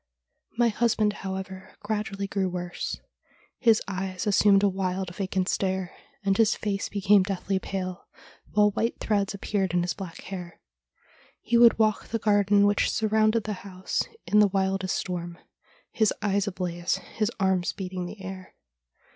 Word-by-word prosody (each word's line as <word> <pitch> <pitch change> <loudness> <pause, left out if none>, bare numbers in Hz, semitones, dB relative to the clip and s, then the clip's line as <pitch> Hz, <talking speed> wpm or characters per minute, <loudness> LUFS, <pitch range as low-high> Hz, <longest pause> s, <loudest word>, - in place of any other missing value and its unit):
My 240 -1 +4
husband, 215 -2 +1
however, 190 0 -6
gradually 210 -2 -3
grew 195 -1 -1
worse. 180 -1 -4 0.6
His 225 -3 +4
eyes 190 -1 -3
assumed 200 -1 +5
a - - +6
wild, 185 -1 -2
vacant 190 -1 -1
stare, 190 -2 -1 0.3
and 195 -1 +2
his 220 0 +3
face 200 -2 -2
became 200 0 +4
deathly 190 0 -1
pale, 185 -2 -5 0.4
while 210 0 +4
white 230 +4 -1
threads 200 -2 0
appeared 195 -3 -1
in 175 - +3
his 175 -1 -1
black 180 -2 -8
hair. 180 -3 -8 0.8
He 240 - -1
would 235 -1 +7
walk 215 -2 +1
the 230 - -1
garden 205 -1 +3
which 205 0 +2
surrounded 215 0 +2
the 210 - -3
house 185 -1 -3 0.2
in 210 - +4
the 210 - +7
wildest 190 -1 0
storm, 175 -2 -4 0.5
his 220 -2 +2
eyes 200 -1 0
ablaze, 180 -2 -2
his 215 0 -3
arms 190 -2 +1
beating 185 -2 -5
the 200 +1 -10
air. 185 0 -8
195 Hz, 150 wpm, -26 LUFS, 185-210 Hz, 0.8 s, would